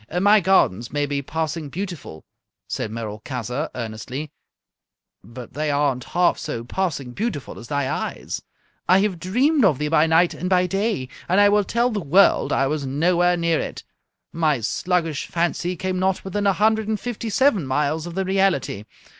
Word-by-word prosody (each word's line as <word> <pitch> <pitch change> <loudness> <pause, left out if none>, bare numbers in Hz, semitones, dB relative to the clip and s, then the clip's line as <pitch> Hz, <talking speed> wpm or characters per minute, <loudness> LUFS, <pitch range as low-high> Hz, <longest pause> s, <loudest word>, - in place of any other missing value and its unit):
"My 205 +3 +6
gardens 120 - +2
may 145 0 0
be 140 0 -2
passing 155 +1 -3
beautiful," 170 - -7 0.4
said - - -3
Merolchazzar, 115 +5 -4
earnestly, 125 +6 -5 0.9
"but 120 +4 -11
they 150 +3 -2
aren't 140 -3 0
half 180 0 +1
so 150 -7 -4
passing 140 -2 -3
beautiful 190 - -4
as 115 - -10
thy 145 -2 -1
eyes. - - -4 0.5
I 185 +2 +6
have 195 -4 -1
dreamed 255 - +2
of 170 -9 +4
thee 150 +1 -2
by 160 0 +4
night 165 +2 +4
and 180 - -4
by 180 -1 +3
day, 195 - -1 0.2
and 185 +3 +4
I 205 0 +6
will 205 0 +3
tell 235 +5 +1
the 215 - -1
world 180 +6 +4
I 135 - +2
was 150 +1 -1
nowhere 175 +6 +2
near 170 -1 +1
it! - - -5 0.5
My 155 -6 +1
sluggish 165 - -1
fancy 175 +1 -1
came 185 +1 -2
not 190 0 0
within 200 +2 -1
a 195 - +4
hundred 220 +1 +2
and 215 -1 -1
fifty 235 -2 -4
seven 215 - +2
miles 150 +4 0
of 170 - -8
the 190 0 -1
reality. 190 - 0
165 Hz, 170 wpm, -22 LUFS, 140-190 Hz, 0.9 s, My